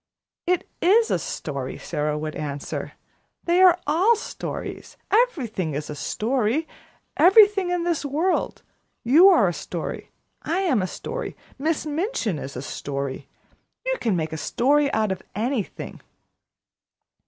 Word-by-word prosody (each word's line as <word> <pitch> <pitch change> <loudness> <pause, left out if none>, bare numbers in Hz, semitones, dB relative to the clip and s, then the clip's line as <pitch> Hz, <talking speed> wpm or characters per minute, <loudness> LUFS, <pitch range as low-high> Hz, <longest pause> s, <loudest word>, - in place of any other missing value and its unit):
"It 360 -1 +1
is 440 +6 +4
a - - +2
story," 135 -3 -5
Sara 150 0 -2
would 155 0 -4
answer. 145 -1 -5 0.5
"They 350 +2 +3
are 365 -2 +7
all 360 +10 +4
stories. 435 - -6
Everything 255 - +1
is 150 +1 -4
a - - -5
story 245 - 0 0.5
everything 395 0 +6
in 355 -1 0
this 340 -3 0
world. 310 +7 -1 0.4
You 305 +11 +7
are - - +5
a - - 0
story - - -5 0.3
I 340 +5 -1
am 310 - +2
a 185 - -1
story - - -6 0.2
Miss 315 +2 0
Minchin 300 - -1
is 140 0 -7
a 125 - -5
story. 140 -1 -5 0.6
You - - +1
can 220 -5 +1
make 160 -1 -2
a - - -3
story 280 - +2
out 215 -4 +1
of 190 - -3
anything." 230 0 -3
280 Hz, 140 wpm, -24 LUFS, -, 0.6 s, are